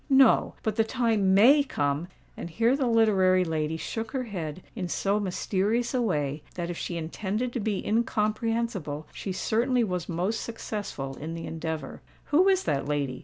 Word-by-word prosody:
No:—but 260 Hz, -5 st, +4 dB
the 225 Hz, -, +5 dB
time 220 Hz, -5 st, +2 dB
may 260 Hz, +9 st, +7 dB
come——" 145 Hz, -, -1 dB, 0.3 s
And -, -, -6 dB
here 230 Hz, +9 st, +2 dB
the 275 Hz, -3 st, 0 dB
literary 195 Hz, -5 st, +4 dB
lady 160 Hz, -1 st, -1 dB
shook 225 Hz, +6 st, -5 dB
her 260 Hz, -2 st, -1 dB
head 180 Hz, -7 st, -5 dB
in 190 Hz, -5 st, -3 dB
so 200 Hz, +4 st, 0 dB
mysterious 205 Hz, +5 st, 0 dB
a 255 Hz, -, +1 dB
way 150 Hz, -9 st, -1 dB
that 175 Hz, -1 st, -3 dB
if 170 Hz, -, -6 dB
she 170 Hz, -, -3 dB
intended 210 Hz, +9 st, -3 dB
to 245 Hz, -, -1 dB
be 205 Hz, -2 st, -2 dB
incomprehensible, 215 Hz, -7 st, -1 dB
she 195 Hz, -, -5 dB
certainly 235 Hz, +6 st, +1 dB
was 180 Hz, -5 st, -3 dB
most 185 Hz, +6 st, -1 dB
successful 205 Hz, -12 st, -5 dB
in 160 Hz, +3 st, -5 dB
the 165 Hz, -, -6 dB
endeavour. 160 Hz, -3 st, -5 dB, 0.3 s
"Who 355 Hz, +6 st, +6 dB
is 380 Hz, -1 st, +3 dB
that 140 Hz, -1 st, -1 dB
lady?" 140 Hz, -3 st, -1 dB
200 Hz, 170 wpm, -27 LUFS, 165-230 Hz, 0.3 s, may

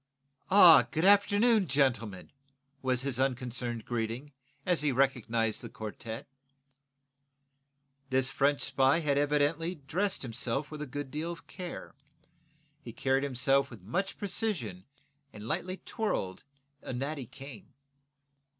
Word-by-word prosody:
"Ah, 175 Hz, -, +8 dB
good 160 Hz, +5 st, 0 dB
afternoon, 205 Hz, +1 st, +5 dB
gentlemen," 120 Hz, -8 st, 0 dB, 0.5 s
was 130 Hz, -1 st, 0 dB
his 135 Hz, -2 st, -2 dB
unconcerned 125 Hz, -3 st, -2 dB
greeting, 120 Hz, +4 st, -3 dB, 0.3 s
as 180 Hz, -3 st, +2 dB
he 150 Hz, -1 st, +2 dB
recognized 115 Hz, -4 st, +1 dB
the -, -, -8 dB
quartette. 110 Hz, +1 st, -7 dB, 1.8 s
This 130 Hz, 0 st, +2 dB
French 140 Hz, +1 st, +1 dB
spy 135 Hz, +4 st, +3 dB
had 145 Hz, -2 st, +1 dB
evidently 150 Hz, +4 st, +1 dB
dressed 175 Hz, +7 st, -2 dB
himself 130 Hz, +4 st, -2 dB
with 155 Hz, -1 st, -7 dB
a 150 Hz, -, -4 dB
good 145 Hz, 0 st, -6 dB
deal 155 Hz, +3 st, -3 dB
of 170 Hz, -, -10 dB
care. 180 Hz, -2 st, -8 dB, 0.9 s
He 120 Hz, -5 st, -9 dB
carried 135 Hz, +2 st, +1 dB
himself 135 Hz, +1 st, +2 dB
with 115 Hz, -7 st, -12 dB
much 185 Hz, -, -2 dB
precision 175 Hz, -, -2 dB, 0.5 s
and 105 Hz, +1 st, -9 dB
lightly 185 Hz, +9 st, -2 dB
twirled 170 Hz, -, -3 dB, 0.4 s
a -, -, -6 dB
natty 135 Hz, +1 st, -4 dB
cane. 135 Hz, -1 st, -11 dB
135 Hz, 125 wpm, -30 LUFS, 120-165 Hz, 1.8 s, Ah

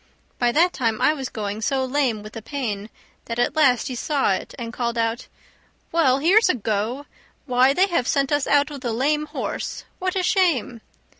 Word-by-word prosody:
By 245 Hz, -1 st, +3 dB
that 350 Hz, +4 st, +3 dB
time 230 Hz, -4 st, -1 dB
I 300 Hz, -, +4 dB
was 270 Hz, -4 st, -5 dB
going 210 Hz, 0 st, -4 dB
so 265 Hz, +3 st, 0 dB
lame 255 Hz, -5 st, 0 dB
with 215 Hz, -, -10 dB
the 225 Hz, -, -7 dB
pain 220 Hz, -5 st, -4 dB, 0.4 s
that 230 Hz, -, -5 dB
at 245 Hz, +4 st, +1 dB
last 265 Hz, -7 st, +3 dB
he 260 Hz, -, -4 dB
saw 270 Hz, -3 st, +1 dB
it, 185 Hz, -, -5 dB
and 235 Hz, -1 st, -6 dB
called 235 Hz, -1 st, -2 dB
out, 230 Hz, +1 st, -1 dB, 0.6 s
"Well, 280 Hz, -6 st, +3 dB
here's 370 Hz, +9 st, +4 dB
a -, -, +3 dB
go! 225 Hz, +5 st, -2 dB, 0.4 s
Why, 255 Hz, 0 st, +4 dB
they 370 Hz, +6 st, +4 dB
have 340 Hz, -10 st, -1 dB
sent 275 Hz, 0 st, +1 dB
us 290 Hz, -1 st, +1 dB
out 290 Hz, +1 st, +3 dB
with 280 Hz, -2 st, -8 dB
a 240 Hz, -2 st, -1 dB
lame 300 Hz, +5 st, 0 dB
horse! -, -, -4 dB, 0.2 s
What 370 Hz, 0 st, -2 dB
a 375 Hz, -, 0 dB
shame!" 325 Hz, -, +1 dB
260 Hz, 200 wpm, -23 LUFS, 230-295 Hz, 0.6 s, I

